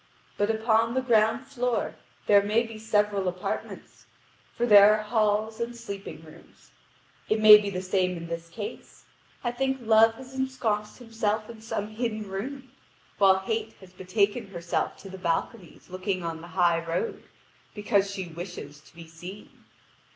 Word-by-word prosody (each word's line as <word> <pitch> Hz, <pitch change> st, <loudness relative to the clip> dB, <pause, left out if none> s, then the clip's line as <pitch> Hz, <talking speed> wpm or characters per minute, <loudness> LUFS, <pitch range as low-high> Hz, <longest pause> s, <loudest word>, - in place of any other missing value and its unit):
But 205 Hz, +1 st, 0 dB
upon 225 Hz, +1 st, +2 dB
the 260 Hz, -, +1 dB
ground 225 Hz, 0 st, +2 dB
floor 250 Hz, -4 st, -2 dB, 0.3 s
there 205 Hz, -1 st, +6 dB
may 215 Hz, +3 st, +1 dB
be 225 Hz, -1 st, -9 dB
several 210 Hz, -3 st, +1 dB
apartments: 180 Hz, 0 st, -5 dB, 0.5 s
for 240 Hz, -, 0 dB
there 210 Hz, -1 st, +8 dB
are 215 Hz, -, -5 dB
halls 215 Hz, 0 st, 0 dB
and 235 Hz, +1 st, -3 dB
sleeping 195 Hz, -8 st, -8 dB
rooms. 160 Hz, +1 st, -18 dB, 0.6 s
It 215 Hz, -, +2 dB
may 215 Hz, -1 st, +10 dB
be 205 Hz, -1 st, -3 dB
the 185 Hz, -1 st, -4 dB
same 185 Hz, -1 st, 0 dB
in 170 Hz, -, -7 dB
this 170 Hz, 0 st, -6 dB
case: 205 Hz, +5 st, -8 dB, 0.4 s
I 240 Hz, -, 0 dB
think 265 Hz, +2 st, -1 dB
Love 225 Hz, -1 st, +5 dB
had 260 Hz, -, -10 dB
ensconced 255 Hz, -6 st, -2 dB
himself 220 Hz, -2 st, -2 dB
in 225 Hz, -1 st, -13 dB
some 210 Hz, -2 st, -4 dB
hidden 215 Hz, -1 st, -3 dB
room, 255 Hz, +7 st, -6 dB, 0.5 s
while 190 Hz, -1 st, +6 dB
Hate 220 Hz, +2 st, -3 dB
had 185 Hz, -1 st, -16 dB
betaken 200 Hz, +4 st, 0 dB
herself 170 Hz, -3 st, -3 dB
to 195 Hz, -, -9 dB
the 190 Hz, -, -9 dB
balconies 175 Hz, +2 st, -3 dB
looking 185 Hz, 0 st, -3 dB
on 165 Hz, -1 st, -4 dB
the 170 Hz, -, -10 dB
high 170 Hz, -2 st, +3 dB
road, 165 Hz, +1 st, -3 dB, 0.5 s
because 200 Hz, -1 st, +1 dB
she 195 Hz, -2 st, -4 dB
wishes 165 Hz, -4 st, -8 dB
to 155 Hz, -, -22 dB
be 165 Hz, -1 st, -11 dB
seen. 175 Hz, +5 st, -10 dB
210 Hz, 160 wpm, -27 LUFS, 185-225 Hz, 0.6 s, may